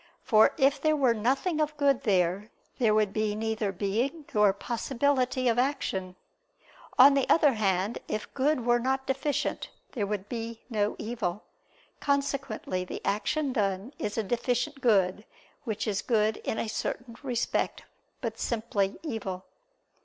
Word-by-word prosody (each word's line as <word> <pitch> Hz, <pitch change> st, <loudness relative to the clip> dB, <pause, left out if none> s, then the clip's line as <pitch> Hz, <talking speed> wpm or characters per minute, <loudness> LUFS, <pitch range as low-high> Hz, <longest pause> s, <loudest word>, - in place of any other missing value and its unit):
For 215 Hz, -1 st, +5 dB
if 275 Hz, -1 st, +3 dB
there 310 Hz, 0 st, +3 dB
were 265 Hz, -5 st, +3 dB
nothing 270 Hz, -, 0 dB
of 305 Hz, 0 st, -1 dB
good 280 Hz, -3 st, +3 dB
there, 190 Hz, +1 st, +1 dB, 0.3 s
there 220 Hz, -4 st, +3 dB
would 210 Hz, -2 st, +2 dB
be 215 Hz, -1 st, 0 dB
neither 220 Hz, -1 st, -1 dB
being 230 Hz, -, -2 dB
nor 210 Hz, -2 st, +5 dB
possibility 255 Hz, +4 st, 0 dB
of 235 Hz, 0 st, +3 dB
action. 195 Hz, -9 st, -1 dB, 0.8 s
On 275 Hz, +2 st, +9 dB
the 275 Hz, -1 st, +1 dB
other 295 Hz, -4 st, +5 dB
hand 200 Hz, 0 st, 0 dB
if 215 Hz, -, -4 dB
good 270 Hz, -2 st, +1 dB
were 240 Hz, 0 st, +4 dB
not 265 Hz, +2 st, -1 dB
deficient, 270 Hz, +2 st, -1 dB, 0.2 s
there 210 Hz, -6 st, -2 dB
would 205 Hz, -1 st, -3 dB
be 230 Hz, -1 st, -5 dB
no 210 Hz, -2 st, 0 dB
evil. 215 Hz, -4 st, -3 dB, 0.6 s
Consequently 275 Hz, -9 st, -1 dB
the 180 Hz, -, -7 dB
action 260 Hz, +8 st, 0 dB
done 200 Hz, +2 st, -1 dB
is 205 Hz, -, -3 dB
a 225 Hz, -, +1 dB
deficient 245 Hz, +4 st, -1 dB
good, 205 Hz, -4 st, +3 dB, 0.4 s
which 215 Hz, -3 st, -2 dB
is 200 Hz, -2 st, 0 dB
good 215 Hz, -2 st, +1 dB
in 220 Hz, -, -3 dB
a -, -, -1 dB
certain 230 Hz, +2 st, -4 dB
respect, 250 Hz, -4 st, -1 dB, 0.4 s
but 225 Hz, -2 st, -4 dB
simply 215 Hz, -4 st, -1 dB
evil. 195 Hz, -, -4 dB
230 Hz, 145 wpm, -28 LUFS, 205-265 Hz, 0.8 s, On